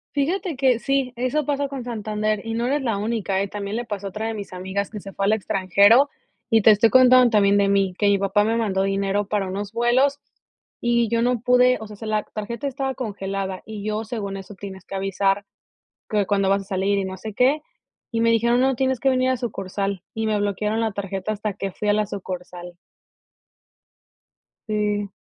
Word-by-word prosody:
Fíjate 330 +2 -1
que 260 -3 +3
sí, 270 -1 0
eso 255 +4 -1
pasa 285 -1 -1
con 265 -3 -6
Santander 215 -2 -2
y 225 - -3
no 235 +1 -1
eres 285 +3 +1
la 230 -6 -1
única, 205 -3 -1
eh. 200 - -1
También 205 +1 -4
le 240 - -3
pasó 200 -3 -5
a - - -4
otra 215 +4 -4
de 225 - -2
mis 205 -2 -7
amigas 190 +2 -3
que 210 - -7
se 195 0 -10
fue 195 - -3
al 200 - +3
extranjero. 205 +5 +4 0.4
Y 225 -2 +4
te 220 - +8
estoy 215 +2 +4
contando 255 +1 +7
también 200 -3 +4
de 200 -1 +3
mí, 195 -2 +2
que 205 - +2
mi 200 - +4
papá 200 +1 +2
me 225 +2 +1
mandó 195 -4 0
dinero 195 +1 0
para 200 -3 0
unos 200 +2 -4
vuelos, 255 +5 +2 0.6
y 235 -1 +2
yo 230 0 +1
no 245 0 +1
pude 250 +1 +4
o 220 - -7
sea 210 - -10
se 225 - -8
la 215 -1 0
tarjeta 235 +6 -5
estaba 270 0 -2
congelada, 195 -4 -4
y 215 -2 -7
yo 215 +1 -1
según 210 -3 -4
eso, 195 +1 -9
tienes 190 -2 -9
que 195 - -7
avisar 195 +1 0 0.6
que 210 -2 +1
cuando 195 -1 +2
vas 195 0 +2
a - - -19
salir, 195 +1 0
y 195 - -1
no 190 0 -5
sé 215 +2 -7
qué, 265 +7 +3 0.5
y 230 - -1
me 230 - +4
dijeron: 235 +2 +3
"No 265 0 +2
tienes 260 -1 0
que 270 - -1
venir 255 0 +2
a 260 - +1
sucursal", 195 -4 -3
y 220 0 -2
me 215 -1 +1
bloquearon 210 +2 -1
la 225 -1 0
tarjeta 195 0 -3
hasta 210 0 -3
que 195 0 -4
fui 210 - -5
a - - +5
la 210 -1 +1
sucursal. 180 -2 -7 1.9
Sí. 210 -2 -1
210 Hz, 215 wpm, -23 LUFS, 195-240 Hz, 1.9 s, te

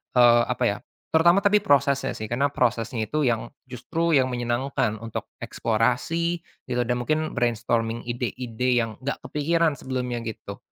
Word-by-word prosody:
eee, 120 -1 +6
apa - - -2
ya - - +1 0.3
terutama 170 +4 +5
tapi 205 +1 +4
prosesnya 140 -6 +2
sih, 110 -1 -6
karena 140 +4 0
prosesnya 115 -2 0
itu 150 -2 0
yang 120 -1 0 0.2
justru 155 +7 -2
yang 130 -2 +4
menyenangkan 120 -1 -1
untuk 115 -1 -5 0.2
eksplorasi 125 +10 0 0.3
dan 125 0 0
mungkin 155 +4 -1
brainstorming 115 -1 0
ide-ide 125 0 -1
yang 115 -2 0
enggak 140 - -2
kepikiran 160 +1 +1
sebelumnya 125 -3 -3
gitu 110 -2 -7
125 Hz, 140 wpm, -25 LUFS, 120-145 Hz, 0.3 s, eee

